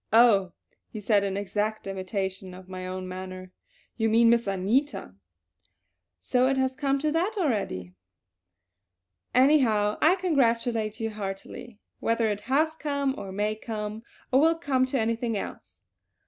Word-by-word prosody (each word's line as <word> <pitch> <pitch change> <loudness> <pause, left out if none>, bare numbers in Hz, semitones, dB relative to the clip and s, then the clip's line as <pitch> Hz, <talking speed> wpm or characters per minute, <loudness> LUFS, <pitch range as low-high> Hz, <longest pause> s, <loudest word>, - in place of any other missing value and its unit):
"Oh," 210 -6 +5 0.4
he 215 - -7
said 205 -1 +2
in 195 -1 -2
exact 210 +2 -2
imitation 190 -1 -4
of 185 0 -13
my 185 -1 -6
own 185 0 -5
manner. 185 0 -7 0.5
"You 225 -1 +1
mean 230 +1 +5
Miss 235 -2 +2
Anita! 200 - 0 1.1
So 255 0 +2
it 270 0 +1
has 260 0 +1
come 275 0 0
to 305 +2 0
that 355 +8 0
already! 200 - -1 1.4
Anyhow 245 -7 +4
I 330 +4 +5
congratulate 235 - +1
you 225 -1 -2
heartily, 205 +3 -7 0.2
whether 230 0 +1
it 205 -1 -2
has 315 +4 +2
come, 280 -3 -1
or 195 -9 -7
may 210 +2 -1
come, 215 -1 -5 0.3
or 265 +2 +5
will 325 +2 +4
come 265 -6 +1
to 260 0 0
anything 230 0 -1
else." - - -8
225 Hz, 145 wpm, -27 LUFS, 195-265 Hz, 1.4 s, Oh